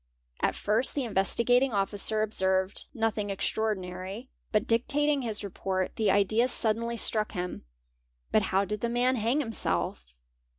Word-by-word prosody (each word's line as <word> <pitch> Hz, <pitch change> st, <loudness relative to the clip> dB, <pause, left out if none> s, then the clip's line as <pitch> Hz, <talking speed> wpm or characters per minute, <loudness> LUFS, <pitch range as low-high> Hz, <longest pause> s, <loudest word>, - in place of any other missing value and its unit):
At -, -, 0 dB
first 220 Hz, +5 st, +3 dB
the 280 Hz, -, 0 dB
Investigating 235 Hz, +4 st, +2 dB
Officer 205 Hz, +2 st, 0 dB
observed 190 Hz, -2 st, 0 dB
as 225 Hz, -1 st, +2 dB
extraordinary, 200 Hz, +1 st, -3 dB, 0.2 s
but 215 Hz, 0 st, +1 dB
dictating 285 Hz, +5 st, +2 dB
his 220 Hz, -4 st, -3 dB
report, 190 Hz, -1 st, -3 dB
the 215 Hz, -2 st, +1 dB
idea 205 Hz, +5 st, +3 dB
suddenly 230 Hz, -1 st, 0 dB
struck 215 Hz, -1 st, 0 dB
him; 180 Hz, -, -5 dB, 0.3 s
'' -, -, -45 dB
But 215 Hz, -, +4 dB
how 195 Hz, +1 st, +2 dB
did 210 Hz, +2 st, -4 dB
the 235 Hz, -, -1 dB
man 245 Hz, +2 st, +1 dB
hang 235 Hz, +7 st, +1 dB
himself?" 85 Hz, -, -2 dB
215 Hz, 140 wpm, -28 LUFS, 190-235 Hz, 0.3 s, But